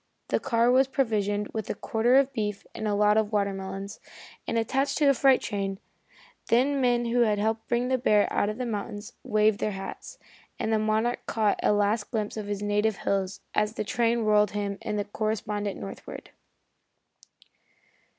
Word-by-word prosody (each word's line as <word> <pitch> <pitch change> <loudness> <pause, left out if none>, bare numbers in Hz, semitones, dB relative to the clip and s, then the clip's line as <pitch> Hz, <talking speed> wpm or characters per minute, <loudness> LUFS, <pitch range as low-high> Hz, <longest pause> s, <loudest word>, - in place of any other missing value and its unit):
The - - +1
car 235 +1 +2
was 260 +1 +4
provisioned 210 -6 0
with 220 -2 -4
a - - -2
quarter 230 +5 +1
of 275 0 +4
beef, 210 -4 -3
and 220 - -4
a 205 - +1
lot 210 +1 +4
of 220 -1 +1
watermelons, 195 -1 -3 0.5
and - - -1
attached 270 +5 0
to 300 - +2
a 280 - +6
freight 270 0 +4
train, 195 -2 -3 0.7
then 270 +4 +3
men 240 -1 +2
who 235 +1 +1
had 215 -3 +3
helped 220 +2 -1
to - - -45
bring 240 +1 0
the 260 -1 +1
bear 210 -4 +3
out 205 - +1
of 215 - -4
the 250 - -3
mountains 210 0 -5
waved 215 -3 +2
their 210 - -1
hats, 195 0 -8 0.4
and 220 - -1
the 220 - +3
Monarch 220 +3 0
caught 215 -3 +1
a - - +3
last 205 +1 +1
glimpse 215 -3 -2
of 215 -2 -5
his 205 0 -3
native 205 +1 +1
hills 190 0 -2
as 210 +1 0
the - - -2
train 235 +1 +1
whirled 210 -1 +3
him 200 -1 -3
and 210 - -3
the 205 - -1
correspondent 210 -1 -3
northward. 100 -1 -9
215 Hz, 185 wpm, -27 LUFS, 205-235 Hz, 0.7 s, a